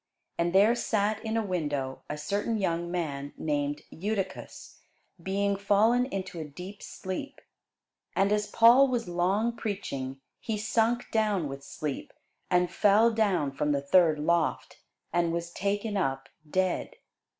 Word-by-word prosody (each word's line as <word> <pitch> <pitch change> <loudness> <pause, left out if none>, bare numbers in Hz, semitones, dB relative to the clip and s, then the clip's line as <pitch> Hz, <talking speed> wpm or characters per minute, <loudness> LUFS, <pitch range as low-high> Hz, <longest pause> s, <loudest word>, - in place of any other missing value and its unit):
And 170 +1 +2
there 200 +5 +5
sat 215 -2 0
in 220 0 -1
a 225 - 0
window 145 -8 -2
a 150 - -3
certain 205 +8 -1
young 170 -3 -1
man 145 -5 -3
named 145 -1 -1
Eutychus, 195 +1 -5 0.4
being 200 +2 0
fallen 215 +5 +3
into 190 -6 -5
a - - -3
deep 180 +7 -9
sleep: 190 +9 -6 0.8
and 195 +1 +2
as 210 0 +1
Paul 240 +4 +6
was 245 -6 -1
long 190 +7 +1
preaching, 140 - -4 0.2
he 220 -2 -3
sunk 225 +3 0
down 210 -7 +1
with 135 0 -7
sleep, 140 0 -5 0.4
and 180 -1 +2
fell 215 +3 +5
down 200 -10 +1
from 150 +2 0
the 140 - 0
third 155 +2 +4
loft, 165 +2 0 0.3
and 170 -1 +2
was 170 0 -3
taken 205 +3 -2
up 135 -8 -1 0.2
dead. 185 +2 0
190 Hz, 140 wpm, -28 LUFS, 160-215 Hz, 0.8 s, Paul